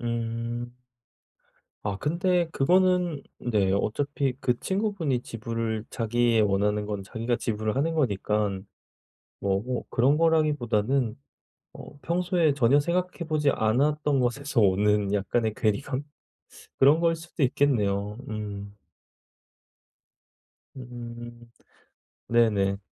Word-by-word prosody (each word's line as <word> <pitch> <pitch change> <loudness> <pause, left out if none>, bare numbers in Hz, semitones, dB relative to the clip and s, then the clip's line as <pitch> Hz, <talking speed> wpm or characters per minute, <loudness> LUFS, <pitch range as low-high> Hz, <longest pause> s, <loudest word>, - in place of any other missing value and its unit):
음. 120 +1 -3 1.1
아 100 -1 -2
근데 170 +2 +1
그거는 180 0 +2 0.2
네 105 -6 +1
어차피 135 +6 0
그 125 -1 0
친구분이 190 - -1
지불을, 115 -1 -4
자기의 115 -1 +2
원하는 105 +1 +1
건 105 -2 -4
자기가 115 +4 -2
지불을 110 +1 -2
하는 165 +4 +1
거니깐 105 -6 0 0.7
뭐 95 -1 +1
어 120 +4 -3
그런 135 +5 +3
거라기보다는 135 -7 +1 0.6
어 - - -11
평소에 170 -2 +1
전혀 135 +1 +4
생각해보지 170 -3 0
않았던 140 +5 +1
것에서 130 +1 0
오는 105 +1 +2
약간의 110 +2 0
괴리감 130 +5 -1 0.8
그런 145 +4 +5
거일 165 -1 +2
수도 165 -1 -6
있겠네요. 105 -7 +1
음. 100 -2 -6 2.0
음. 120 -1 -8 1.0
네네. 105 -4 +2
120 Hz, 225 characters per minute, -26 LUFS, 105-145 Hz, 2.0 s, 그런